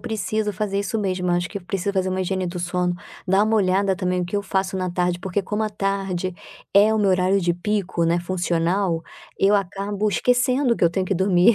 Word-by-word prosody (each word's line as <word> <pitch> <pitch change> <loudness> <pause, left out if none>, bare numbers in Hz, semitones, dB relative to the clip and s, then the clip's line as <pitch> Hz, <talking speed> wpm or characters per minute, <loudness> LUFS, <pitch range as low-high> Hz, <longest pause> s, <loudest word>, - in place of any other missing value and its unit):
preciso 215 -2 -2
fazer 200 0 -1
isso 210 +2 -2
mesmo, 185 -3 -1
eu - - +3
acho 175 0 -1
que 200 - -5
eu - - -18
preciso 195 +1 -2
fazer 190 -1 0
uma 185 0 -1
higiene 185 0 -1
do 180 0 -4
sono. 180 +1 0 0.3
Dar 195 +3 +4
uma 220 +1 +1
olhada 195 -1 +2
também 180 -1 -1
o - - -1
que 180 +4 -3
eu 200 - -1
faço 190 -1 -1
na 185 -1 -2
tarde, 180 0 0
porque 190 +1 -1
como 210 +3 -2
à 215 - -1
tarde 195 -3 -2 0.4
é 210 +2 +6
o 220 - +1
meu 200 -2 +3
horário 185 +2 +2
de 175 -1 +1
pico, 190 -2 -1
né, 170 +1 +2
funcional, 175 0 0 0.4
eu 200 +2 +4
acabo 200 +2 -1
esquecendo 250 - +2
que - - -7
eu 170 - +5
tenho 185 +2 -1
que 195 - 0
dormir 190 +4 +4
190 Hz, 230 wpm, -22 LUFS, 180-205 Hz, 0.4 s, é